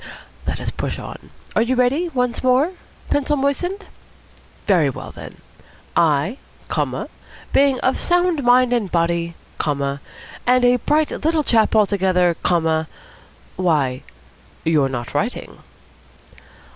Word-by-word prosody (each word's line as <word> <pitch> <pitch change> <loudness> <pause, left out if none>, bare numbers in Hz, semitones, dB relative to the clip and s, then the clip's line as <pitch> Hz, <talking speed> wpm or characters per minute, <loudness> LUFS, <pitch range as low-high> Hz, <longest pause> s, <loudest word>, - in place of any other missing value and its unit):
Let - - -2
us - - -3
push - - -4
on. - - -9 0.3
Are - - +4
you 245 +3 +1
ready, 265 +8 +2
once 250 -5 -1
more? 255 +6 +3 0.4
Pencil 290 +1 +1
moistened? 355 +9 -1 0.8
Very 175 -8 +3
well, 130 - -7
then. - - -11 0.6
'I' 160 - +2 0.3
comma - - -2 0.5
'being 275 -2 +4
of 260 - +1
sound 355 -3 +2
mind 245 0 +4
and 220 -6 0
body' 170 0 0 0.2
comma 140 -2 -1 0.5
'and 250 0 +4
a 245 0 +5
bright 300 +5 +1
little 315 0 0
chap 225 -4 +3
altogether' 190 -4 +3
comma 160 -2 +1 0.7
Why, 150 -8 +1 0.6
you're 150 -4 +2
not 120 -3 -5
writing." 215 +12 -3
225 Hz, 120 wpm, -20 LUFS, 165-270 Hz, 0.8 s, a